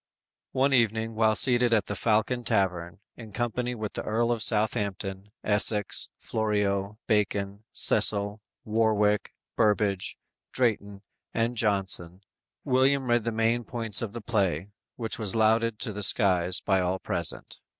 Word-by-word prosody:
One 135 +1 +2
evening 115 -2 +1
while 110 0 +2
seated 120 -1 +4
at 105 - +1
the 105 - -4
Falcon 110 +4 0
Tavern, 90 -3 -1
in 110 -3 -11
company 120 +2 -2
with 110 -2 -5
the - - -4
Earl 115 +2 0
of 115 -2 -1
Southampton, 100 -3 0 0.2
Essex, 105 0 +3
Florio, 105 -2 -1
Bacon, 100 -1 -1
Cecil, 100 0 0 0.2
Warwick, 105 -2 +1 0.2
Burbage, 105 -3 0 0.3
Drayton 105 -5 -1 0.3
and 115 +1 0
Jonson, 95 -4 -1 0.4
William 135 +1 +2
read 120 -2 +2
the 115 - 0
main 115 +2 0
points 115 -4 +1
of 110 -3 -4
the 120 - -6
play, 100 -5 -1 0.3
which 115 -2 -5
was 105 -2 -1
lauded 110 0 +2
to 110 -4 -2
the 105 - -5
skies 90 -3 +3
by 95 -1 +1
all 90 +1 -1
present. - - -4
110 Hz, 140 wpm, -27 LUFS, 100-115 Hz, 0.4 s, seated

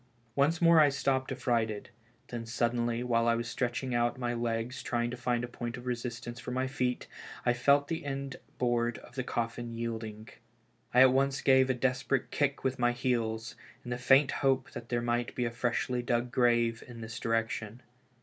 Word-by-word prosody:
Once 150 +4 +3
more 170 -1 +6
I 150 -2 +7
stopped 135 -1 0
affrighted; 115 -5 -1 0.4
then 115 -2 -5
suddenly, 120 0 0
while 115 -1 +2
I 115 - +4
was 115 0 -3
stretching 125 +1 -2
out 120 0 +1
my 120 -1 -1
legs 115 +1 -2
trying 120 0 -1
to - - -4
find 120 -1 -1
a - - -2
point 120 0 -5
of 120 - -10
resistance 120 -1 -4
for 125 - -7
my 130 +1 0
feet, 125 -2 -1 0.4
I 120 - +4
felt 140 +4 +3
the 165 +1 -3
end 135 -1 -4 0.2
board 120 -1 +1
of - - -14
the 130 0 -2
coffin 115 -1 -3
yielding. 110 -2 -5 0.6
I 125 - +6
at 130 -1 +7
once 135 +1 +1
gave 130 -1 +5
a 130 - +2
desperate 130 +1 0
kick 140 -1 0
with 130 0 -1
my 120 0 +3
heels, 115 -2 -1 0.3
in 120 - -7
the 125 - -1
faint 135 +3 +5
hope 135 -2 +1
that 120 - -8
there 120 -1 0
might 120 0 -1
be 125 - 0
a 120 - -1
freshly 125 +1 -1
dug 120 0 0
grave 120 -2 +2
in 120 -2 -9
this 110 +1 -6
direction. 115 0 -2
120 Hz, 190 wpm, -31 LUFS, 120-130 Hz, 0.6 s, I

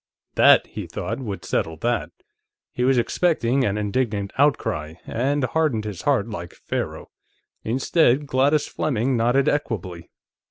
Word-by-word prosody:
That, - - +6
he - - -7
thought, 110 +8 -4
would 105 -7 -6
settle 80 0 -1
that. 120 +8 -1 0.6
He 125 - -2
was 130 0 +3
expecting 130 -1 +1
an 105 -3 0
indignant 105 -1 -1
outcry, 110 - 0
and 140 +4 -1
hardened 130 -5 0
his 105 -5 -5
heart, - - +1
like - - -7
Pharaoh. - - -5 0.5
Instead, 135 +3 +2
Gladys 140 +2 +2
Fleming 130 -2 -1
nodded 120 +4 +2
equably. 95 - -2
120 Hz, 130 wpm, -23 LUFS, 105-140 Hz, 0.6 s, That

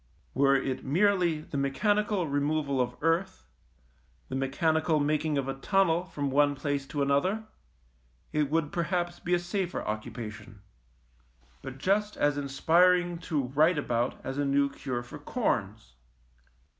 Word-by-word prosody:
Were 140 0 +4
it 135 -1 -1
merely 175 +1 +2
the 145 -2 -5
mechanical 205 +7 +1
removal 145 -1 0
of 125 0 -2
earth, 165 +4 0 0.8
the - - -4
mechanical 155 +4 +1
making 150 +1 0
of 135 -1 -1
a 135 - -1
tunnel 175 +4 +1
from 145 -5 -3
one 145 +1 +3
place 140 0 -2
to 145 0 -1
another, 160 +11 +1 0.9
it 150 -2 +1
would 155 -1 0
perhaps 175 +1 -1
be 175 0 +1
a - - +2
safer 180 +1 -3
occupation, 105 -1 -6 1.0
but 135 0 -8
just 205 +7 0
as 145 -1 +2
inspiring 170 +5 +2
to 155 -4 -1
write 155 +5 +3
about 120 -3 -1
as 135 +2 -3
a - - +2
new 140 0 +2
cure 125 -3 -4
for 120 - -10
corns. - - -2
145 Hz, 140 wpm, -29 LUFS, 135-175 Hz, 1.0 s, Were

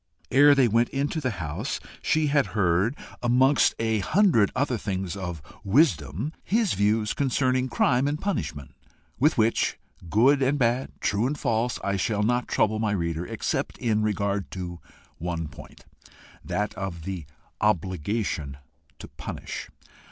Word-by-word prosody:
Ere 145 +2 +7
they 135 -3 +4
went 115 +2 +2
into 145 +4 -2
the 130 - 0
house 85 - -3 0.2
she 155 -3 +2
had 140 -1 +2
heard, 95 +6 +2 0.3
amongst 130 +3 +4
a 110 -1 0
hundred 140 - +3
other 130 -1 +1
things 95 -4 -3
of 90 -6 -5 0.2
wisdom, 100 - +2
his 220 -1 +1
views 105 +2 +1
concerning 130 -2 +1
crime 125 +2 +2
and 150 +1 -1
punishment 75 - -3 0.5
with 150 +4 +3
which, 115 0 +2 0.3
good 135 - +4
and 135 +2 +2
bad, 125 0 +1
true 105 +4 +1
and 145 +2 -2
false, 120 -2 0
I 100 0 0
shall 105 +2 0
not 120 +2 +1
trouble 110 0 +1
my 110 -2 0
reader, 85 -2 -2
except - - -2
in 110 -3 +1
regard 100 -2 -1
to 90 -2 -6 0.4
one 85 -1 -3
point 75 -1 -13 0.6
that 105 0 -2
of 90 -4 -5
the 90 -5 -5 0.3
obligation 95 -6 -1 0.4
to - - -10
punish. - - -7
110 Hz, 145 wpm, -26 LUFS, 95-130 Hz, 0.6 s, Ere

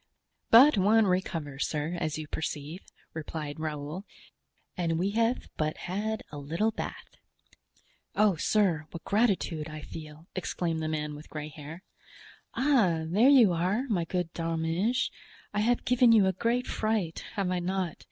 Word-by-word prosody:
"But 255 +1 +8
one 215 +3 +5
recovers, 165 -7 -1
sir, 155 +3 -2
as 155 -2 -2
you 155 -1 -6
perceive," 155 +2 -4 0.3
replied 155 -2 -5
Raoul, 155 +3 -4 0.7
"and 165 -2 0
we 190 +4 0
have 230 +3 +1
but 155 0 -1
had 215 +4 -3
a 145 - -6
little 165 +10 0
bath." - - -7 1.0
"Oh! 210 -3 +4
sir, 165 -3 +1
what 165 - -9
gratitude 195 -8 +1
I 155 0 -7
feel!" 155 0 -9
exclaimed 170 -3 -2
the 155 - -2
man 150 -1 -2
with 150 +1 -11
gray 150 -1 -6
hair. 155 +4 -10 0.7
"Ah, 220 - +3
there 205 +11 +4
you 240 -10 +7
are, 185 +8 0
my 180 -6 +1
good 180 -1 -2
D'Arminges; 165 +8 0 0.4
I 205 - 0
have 235 +3 +1
given 250 -1 +5
you 215 -4 +6
a 190 - +2
great 235 +6 0
fright, 215 -7 -1
have 195 -3 0
I 180 - 0
not? 180 -1 -2
175 Hz, 150 wpm, -29 LUFS, 155-210 Hz, 1.0 s, But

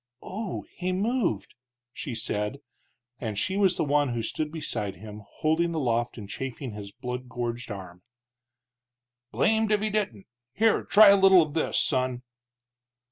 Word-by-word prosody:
"Oh! 205 0 -5
he 180 0 -2
moved!" 200 - 0 0.4
she 130 -3 -5
said. 105 +2 -2 0.6
And 110 -4 -4
she 190 - 0
was 195 -3 +3
the - - +1
one 145 -1 +2
who 115 -1 -2
stood 150 +6 -3
beside 105 -11 -4
him, 105 +1 -10
holding 165 +2 0
aloft 120 -5 0
and 105 -3 -7
chafing 135 +3 -5
his 105 -1 -8
blood 125 +3 -6
gorged 120 0 -4
arm. 90 -3 -8 1.3
"Blamed 220 0 +2
if 210 - +4
he 215 +1 -1
didn't! 195 - -2 0.3
Here 225 +8 +2
try 210 0 +8
a 200 - +8
little 190 -3 +7
of 150 -2 -7
this, 160 - 0
son." 130 -1 0
135 Hz, 150 wpm, -27 LUFS, 115-190 Hz, 1.3 s, try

